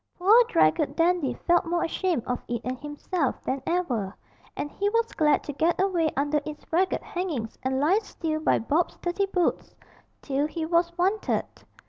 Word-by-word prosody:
Poor 425 +7 +6
draggled 160 - +2
Dandy 335 -7 +2
felt 345 0 +4
more 345 0 -1
ashamed 340 - -1
of 250 -1 -2
it 235 -1 -3
and 255 0 -4
himself 295 0 -2
than 265 +1 -2
ever, 245 - -1 0.4
and 290 - -3
he 405 +1 0
was 460 +1 0
glad 300 -2 +2
to 290 - -5
get 330 +5 +1
away 360 -4 +2
under 290 +1 +1
its 305 0 -8
ragged 370 +3 +1
hangings 315 -12 -4
and 265 0 -1
lie 335 +9 +3
still 320 -7 -4
by 310 - +2
Bob's 310 +9 0
dirty 360 +3 -1
boots 360 -3 -1 0.5
till 280 +1 0
he 320 +1 -4
was 340 +1 +2
wanted. 385 +5 +1
325 Hz, 170 wpm, -26 LUFS, 280-360 Hz, 0.5 s, Poor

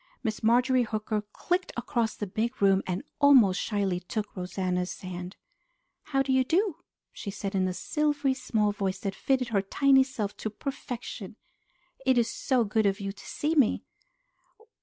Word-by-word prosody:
Miss 220 -3 -2
Marjorie 250 +3 +4
Hooker 215 -1 -1
clicked 360 - -1
across 235 -2 -1
the 210 - -3
big 225 +6 -2
room 195 -1 +4
and 185 +6 -2 0.2
almost 255 -10 +6
shyly 200 -4 0
took 205 +4 -5
Rosanna's 180 -1 -2
hand. 180 0 -6 0.7
"How 270 -2 +1
do 265 0 0
you 260 0 +4
do?" 340 - +1 0.4
she 200 - -6
said 195 0 -4
in 190 -1 +2
a 185 - -2
silvery, 290 0 0
small 220 -5 0
voice 195 -2 -2
that 195 -1 -2
fitted 255 +2 0
her 205 -4 +2
tiny 270 +7 +4
self 235 -6 -4
to 220 - -3
perfection. 240 -3 -6 0.7
"It 260 -2 +3
is 230 -1 +2
so 255 -3 +1
good 215 0 +1
of 195 0 0
you 195 -1 -3
to 195 - -14
see 300 +2 -1
me!" 280 -8 +3
220 Hz, 165 wpm, -28 LUFS, 195-260 Hz, 0.7 s, almost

